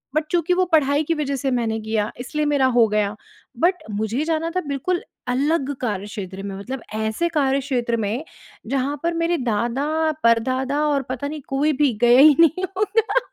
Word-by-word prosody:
But 310 - +2
चूँकि 350 0 +2
वो 370 +1 +2
पढ़ाई 290 0 +3
की 330 - 0
वज़ह 285 -3 -2
से 270 0 -2
मैंने 225 -2 0
किया 220 -1 -1
इसलिए 300 +4 -2
मेरा 285 -3 +2
हो 230 -2 +6
गया। 210 0 0 0.4
बट 360 +2 +2
मुझे 220 +7 -1
जाना 325 0 -1
था 365 - +1
बिल्कुल 315 +6 -1 0.3
अलग 280 +3 0
कार्यक्षेत्र 200 -3 -4
में। 195 -1 -5
मतलब 250 +5 -6
ऐसे 220 +10 -1
कार्यक्षेत्र 270 -5 0
में 225 +7 -2 0.4
जहाँ 275 +3 -1
पर 340 0 +1
मेरे 335 +1 0
दादा-परदादा 260 +2 0
और 285 -2 +1
पता 265 +2 -3
नहीं 300 0 -6
कोई 290 +3 +1
भी 285 -5 +3
गया 240 +2 +6
ही 295 0 +8
नहीं 335 +3 +4
होगा। 435 +4 +2
275 Hz, 170 wpm, -22 LUFS, 230-310 Hz, 0.4 s, ही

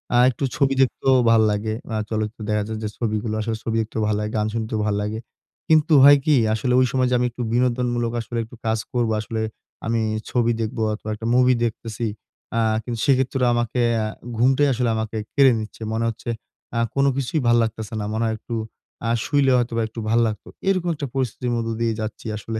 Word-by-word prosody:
আ - - +5
একটু 130 +2 -4
ছবি 135 -2 +2
দেখতেও 130 0 +3 0.2
ভাল 115 - +5
লাগে। 105 +1 -1 0.2
অ্যা 110 - -2
চলচ্চিত্রে 110 0 -3
দেখাচ্ছে 105 +1 -1
যে, 110 - -1
ছবিগুলো 110 -1 -2
আসলে 110 0 -2
ছবি 115 - -2
দেখতেও 110 0 -4
ভালো 105 -1 +1
লাগে, 105 0 -3
গান 105 - +1
শুনতেও 110 -1 -2
ভাল 105 -1 +1
লাগে। 105 +2 -3 0.5
কিন্তু 155 0 +4
হয় 145 +1 +9
কি? 155 - +4 0.2
আসলে 115 +3 0
ঐ - - +5
সময় 130 -1 +2
যে 125 - +2
আমি 125 - +2
একটু 125 - -7
বিনোদনমূলক 120 -1 +1
আসলে 115 +1 -6
একটু 115 +3 -12
কাজ 110 0 +1
করব, 120 -2 +1
আসলে 110 +1 -4 0.4
আমি 115 0 +1 0.3
ছবি 120 -1 +2
দেখবো 115 +1 -3
অথবা 110 0 -6
একটা 115 +1 -5
মুভি 125 0 +5
দেখতেছি। 115 0 -4 0.5
অ্যা 115 - +1 0.2
কিন্তু 120 -1 -4
সেক্ষেত্রে 130 -1 +2
আমাকে 120 +1 0 0.2
অ্যা 110 -1 0 0.3
ঘুমটাই 135 +4 +4
আসলে 120 -1 0
আমাকে 110 0 -3 0.2
কেড়ে 135 -2 +6
নিচ্ছে। 110 +1 -8
মনে 115 +1 0
হচ্ছে 115 +1 -7 0.5
আ - - +2 0.2
কোন 140 0 +3
কিছুই 140 +3 -1
ভাল 120 - +5
লাগতাছে 110 0 -4
না। 105 - -3
মনে 110 +1 0
হয় 110 - 0
একটু 120 - -8 0.5
আ - - +1
শুইলে 140 -2 +2
হয়তোবা 115 -1 0
একটু 115 +1 -9
ভাল 115 +1 +3
লাগত। 105 -2 -5 0.2
এরকম 185 -3 +1
একটা 145 -2 -4
পরিস্থিতির 125 -1 -1
মধ্যে 115 -1 -2
দিয়ে 115 -1 +1
যাচ্ছি 110 0 -6
আসলে। 110 +1 -5
115 Hz, 200 wpm, -22 LUFS, 110-125 Hz, 0.5 s, হয়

